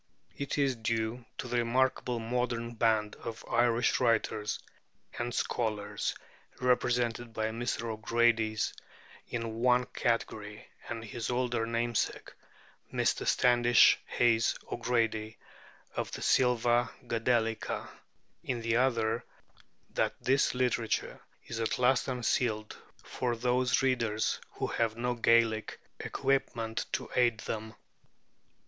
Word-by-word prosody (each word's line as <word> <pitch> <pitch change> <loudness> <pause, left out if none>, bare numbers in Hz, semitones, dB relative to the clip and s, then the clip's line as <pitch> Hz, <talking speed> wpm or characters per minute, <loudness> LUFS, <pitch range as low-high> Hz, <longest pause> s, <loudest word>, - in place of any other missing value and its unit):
It 140 +1 -3
is 140 -3 +2
due 115 +1 -2
to - - -4
the 120 - -1
remarkable 125 +1 +1
modern 120 0 -2
band 110 -2 +1
of 115 -1 -7
Irish 120 0 +2
writers 110 -3 +1 0.6
and 120 - -2
scholars 105 -4 -2 0.4
represented 120 -2 +1
by 110 0 0
Mr. 115 +1 -2
O'Grady 115 0 +1 0.7
in 120 - -3
the 115 - -3
one 125 +2 +2
category, 110 -4 -2 0.2
and 115 -1 -4
his 110 +1 -4
older 120 -2 0
namesake, 115 0 -1 0.6
Mr. - - 0
Standish 120 -1 +5
Hayes 115 -1 +2 0.2
O'Grady 115 -2 0 0.6
of - - -2
the - - -5
'Silva 120 -1 +3 0.2
Gadelica,' 115 -1 0 0.6
in 120 -2 -2
the 115 0 +1
other, 115 -2 +1 0.7
that - - 0
this 135 0 +2
literature 125 -3 0 0.2
is 115 - -5
at 115 - 0
last 125 +1 +3
unsealed 115 -3 0 0.3
for 120 -2 -2
those 125 +2 +1
readers 115 -5 +1
who - - -2
have 115 -1 -1
no 125 +1 0
Gaelic 115 -2 +2 0.2
equipment 120 -4 -1
to - - -2
aid 120 -3 +3
them. 110 0 -5
115 Hz, 115 wpm, -31 LUFS, 110-125 Hz, 0.7 s, Standish